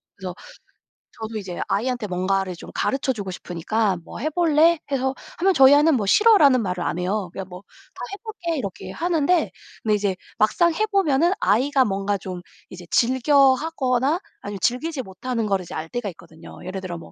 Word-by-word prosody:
그래서 185 -2 -6 0.9
저도 220 0 -5
이제 185 -4 -6
아이한테 235 +2 -1
뭔가를 185 0 -1
좀 - - -11
가르쳐 270 -1 0
주고 200 -5 -6
싶으니까 185 +3 -1
"뭐 - - -10
해 310 - -1
볼래?" 330 0 +4
해서 265 -1 0 0.2
하면 380 +2 +3
저희 270 -2 +7
아이는 305 +2 +4
뭐 210 -5 -1
"싫어."라는 295 - +6
말을 180 -2 -2
안 165 - -2
해요. 185 +1 -2
그냥 190 -1 -6
뭐 180 0 -10 0.3
"다 - - -11
해 - - -4
볼게." 355 -7 -4
이렇게 200 -9 -5
하는데 340 0 +1 0.3
근데 215 -1 +2
이제 200 -2 -1 0.2
막상 335 +11 +3
해 430 +7 +1
보면은 350 -5 +2
아이가 265 +3 +3
뭔가 200 0 -1
좀 185 -2 -7 0.3
이제 180 -1 -10
즐겨 260 +2 +4
하거나 270 +1 0 0.2
아니면 200 -1 -6
즐기지 265 +3 -1
못하는 225 +4 -4
거를 195 -3 0
이제 175 - -9
알 155 - -4
때가 230 +3 -4
있거든요. 160 -2 -13
예를 190 +1 -5
들어 180 -2 -5
뭐 165 - -12
235 Hz, 380 characters per minute, -23 LUFS, 190-290 Hz, 0.9 s, 저희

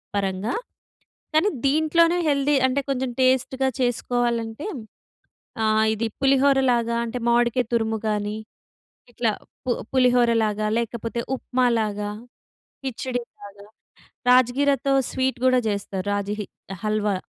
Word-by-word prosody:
పరంగా 195 +1 -1 0.8
కానీ 315 +7 +4 0.2
దీంట్లోనే 315 +4 +3
హెల్తీ, 285 0 +2
అంటే 260 +2 0
కొంచెం 265 -1 -1
టెస్ట్‌గా 260 +1 +2
చేసుకోవాలంటే 240 0 -1 1.0
ఆహ్, 220 0 +3
ఇది 225 +1 -1
పులిహోర 275 0 +4
లాగా 235 -1 +1
అంటే 235 +2 -4
మామిడికాయ 240 +1 +2
తురుము 225 -1 +1
గాని 210 0 -1 0.8
ఇట్లా 235 -1 0 0.4
పు - - 0 0.2
పులిహోర 250 -2 +4
లాగా 215 0 -1
లేకపోతే 235 0 -3 0.2
ఉప్మా 255 0 0
లాగా, 210 -1 -2 0.7
కిచిడి 255 -1 -3 0.2
లాగా, 200 0 -12 0.7
రాజ్ 250 -1 +6
గీరతో 280 -1 +2 0.2
స్వీట్ 260 -1 -1
గూడా 255 -1 +4
జెస్తారు. 200 -2 -3
రాజ 205 -1 -1
హి 205 - -4 0.4
హల్వా. 210 -2 0
240 Hz, 115 wpm, -23 LUFS, 215-265 Hz, 1.0 s, రాజ్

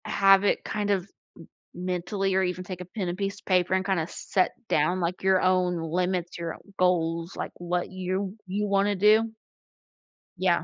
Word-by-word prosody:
Have 195 0 +5
it, 205 - +1
kind 210 -1 -2
of 190 -3 +1 0.7
m 180 - -6
mentally 185 +2 -1
or 190 - +3
even 180 0 -2
take 185 -2 -7
a - - -6
pen, 185 +1 -4
and 175 - -4
piece 200 0 -3
of - - -26
paper, 185 -1 +2
and 190 0 +1
kinda 175 -5 0
set 185 +1 0 0.2
down, 155 +5 +2
like, 175 +1 -2
your 190 -1 +4
own 180 -2 +2
limits, 175 +2 -1
your 170 -1 -4 0.2
goals, 170 -1 +1
like, - - -4
what 175 0 -2
you 185 +1 -3
you 205 +3 -1
wanna 200 +1 +2
do. 215 +3 +4 1.0
Yeah. 180 -1 +2
185 Hz, 180 wpm, -27 LUFS, 175-195 Hz, 1.0 s, Have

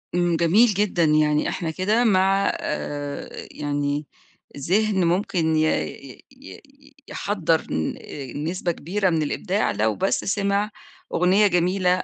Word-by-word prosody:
امم 175 -1 +2
جميل 175 +9 +4
جدًا 190 -4 +1
يعني 150 -1 +2
إحنا 165 -3 -3
كده 210 +8 +1
مع 195 -2 +3
آآ 145 -1 -5
يعني 145 0 -2 0.5
ذهن 190 +5 +1
ممكن 170 -2 +1
ي 155 - +3
ي 135 -4 -4
ي 285 +1 -16
يحضّر 170 -6 0
ن 80 0 -1
آآ 135 -4 -8
نسبة 175 +3 -2
كبيرة 190 +4 -1
من 160 -2 +1
الإبداع، 185 +7 -1
لو 110 +1 0
بس 195 - 0
سمع 200 +1 0 0.4
أغنية 190 +4 +4
جميلة 180 0 +1
180 Hz, 130 wpm, -23 LUFS, 155-200 Hz, 0.5 s, جميل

